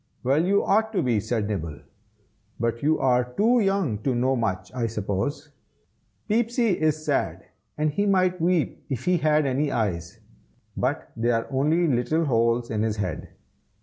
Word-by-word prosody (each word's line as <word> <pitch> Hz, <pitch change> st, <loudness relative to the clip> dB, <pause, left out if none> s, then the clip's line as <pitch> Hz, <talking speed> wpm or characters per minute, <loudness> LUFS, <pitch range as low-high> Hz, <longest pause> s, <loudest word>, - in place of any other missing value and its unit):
"Well, 140 Hz, +5 st, +2 dB
you 200 Hz, +3 st, +2 dB
ought 220 Hz, +2 st, +2 dB
to 195 Hz, -, +1 dB
be!" 120 Hz, -4 st, +1 dB
said 110 Hz, 0 st, -2 dB
Nibble, 80 Hz, -8 st, -4 dB, 0.8 s
"but 115 Hz, 0 st, -1 dB
you 155 Hz, +2 st, +2 dB
are 125 Hz, -1 st, +2 dB
too 210 Hz, -, +2 dB
young 195 Hz, -, 0 dB
to 130 Hz, +3 st, -1 dB
know 130 Hz, +2 st, +1 dB
much, 100 Hz, -5 st, -2 dB
I 120 Hz, -2 st, -1 dB
suppose. 105 Hz, +7 st, -3 dB, 0.8 s
Peepsy 235 Hz, +2 st, +1 dB
is 155 Hz, 0 st, +1 dB
sad, 145 Hz, -3 st, -1 dB, 0.3 s
and 155 Hz, 0 st, +1 dB
he 205 Hz, +7 st, 0 dB
might 185 Hz, -2 st, +2 dB
weep 175 Hz, -2 st, 0 dB
if 130 Hz, -2 st, -4 dB
he 180 Hz, 0 st, +3 dB
had 155 Hz, -1 st, +2 dB
any 140 Hz, +2 st, 0 dB
eyes, 85 Hz, -7 st, -2 dB, 0.6 s
but -, -, -2 dB
they 115 Hz, +1 st, 0 dB
are 115 Hz, -1 st, +1 dB
only 155 Hz, +6 st, +2 dB
little 155 Hz, +5 st, +1 dB
holes 115 Hz, -2 st, +1 dB
in 105 Hz, -1 st, -1 dB
his 110 Hz, -1 st, 0 dB
head. 90 Hz, -6 st, -4 dB
135 Hz, 165 wpm, -25 LUFS, 115-165 Hz, 0.8 s, he